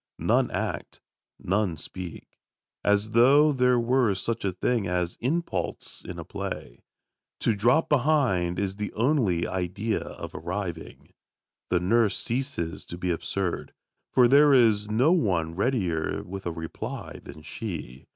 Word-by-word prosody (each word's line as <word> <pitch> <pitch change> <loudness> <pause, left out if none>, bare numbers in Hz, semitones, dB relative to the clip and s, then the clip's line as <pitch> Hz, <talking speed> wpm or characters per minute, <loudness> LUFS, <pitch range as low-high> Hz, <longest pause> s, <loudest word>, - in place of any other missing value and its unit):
None - - +2
act, - - -4 0.4
none 95 -3 0
speak, 90 +3 -9 0.4
as 105 +1 +2
though 140 +7 +6
there 125 -2 +3
were 120 -3 +2
such 115 +3 -3
a 100 - 0
thing 105 +3 0
as 90 -1 -1
impulse 130 - -3
in - - -7
a - - -7
play. - - -6 0.6
To 115 - +2
drop 120 +10 +3
behind 125 - +2
is 100 0 -2
the 105 0 -3
only 110 - +1
idea 95 +5 -2
of - - -8
arriving. 85 -3 -6 0.6
The 90 - +2
nurse 105 +3 +2
ceases 120 - -3
to 85 - -8
be 90 0 -1
absurd, 90 +2 -3 0.4
for 125 -1 +6
there 145 +3 +6
is 110 -4 +4
no 125 +9 +3
one 90 - +1
readier 95 -6 -1
with 95 0 -7
a - - -1
reply 80 0 -6
than 75 +2 -11
she. 80 - -7
100 Hz, 140 wpm, -26 LUFS, 90-125 Hz, 0.6 s, though